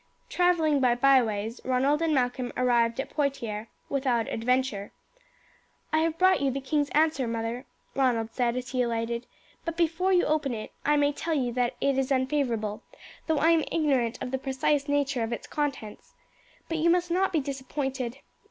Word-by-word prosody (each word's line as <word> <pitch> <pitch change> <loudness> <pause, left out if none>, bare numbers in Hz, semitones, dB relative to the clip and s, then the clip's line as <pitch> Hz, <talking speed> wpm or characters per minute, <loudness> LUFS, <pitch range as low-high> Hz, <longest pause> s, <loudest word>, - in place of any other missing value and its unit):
Travelling 335 -5 +2
by 250 -2 +3
byways 235 -4 +2
Ronald 270 +4 +1
and 330 -1 +1
Malcolm 250 -2 0
arrived 240 -1 +2
at 270 - -3
Poitiers 235 -7 -2 0.2
without 260 -5 0
adventure. 240 -3 -1 1.0
"I 315 - +4
have 325 0 0
brought 370 -2 +4
you 275 - +2
the 270 +1 -2
king's 290 +2 0
answer, 305 -4 +2
mother," 230 +2 -3 0.3
Ronald 235 -4 +1
said 245 -1 0
as 250 0 -4
he 255 0 0
alighted; 235 0 -2 0.4
"but 335 -1 -4
before 345 +3 +1
you 360 -1 +4
open 295 -5 0
it 215 - -7
I 295 - +3
may 290 0 +2
tell 325 +2 -2
you 250 -4 0
that 245 -1 0
it 275 -1 +2
is 270 0 -1
unfavourable, 255 -6 0 0.5
though 320 -2 +2
I 320 +3 +4
am 325 -2 +3
ignorant 265 -7 +1
of 250 - -5
the 265 - -1
precise 275 +2 0
nature 285 -3 0
of 225 +1 -2
its 235 - -4
contents. 280 -8 -4 0.5
But 325 -1 -2
you 335 +2 +3
must 350 0 +2
not 380 +2 +2
be 325 - +2
disappointed. 265 -2 -4
265 Hz, 175 wpm, -27 LUFS, 240-300 Hz, 1.0 s, I